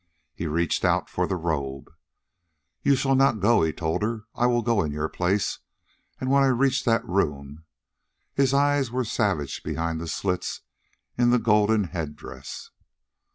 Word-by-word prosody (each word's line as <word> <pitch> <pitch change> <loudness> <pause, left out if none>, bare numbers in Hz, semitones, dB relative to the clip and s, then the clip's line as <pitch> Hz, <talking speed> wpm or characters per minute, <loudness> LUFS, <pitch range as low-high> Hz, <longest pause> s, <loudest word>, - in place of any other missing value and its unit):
He 85 - -4
reached 85 +1 0
out - - +1
for - - 0
the - - -1
robe. 70 -5 -3 0.9
"You 140 - +4
shall 135 +1 +1
not 135 -4 +3
go," 115 +5 +4
he 80 -1 +2
told 80 +2 -2
her. 110 0 -2
"I 120 - +2
will 120 -1 +1
go 115 -3 +2
in 75 - -2
your 75 +1 -2
place. 95 +2 0 0.6
And 130 0 -1
when 140 0 +5
I 135 - +5
reach 130 +1 +2
that 115 -2 +2
room...." 75 -4 -2 0.7
His 135 -2 +2
eyes 140 -1 +2
were 125 +1 -1
savage 95 -11 -1
behind 80 0 -3
the 85 - -5
slits 90 +2 -2 0.6
in 120 0 +4
the 125 - +5
golden 105 -1 +3
head 80 -5 -5
dress. - - -9
105 Hz, 165 wpm, -25 LUFS, 80-125 Hz, 0.9 s, when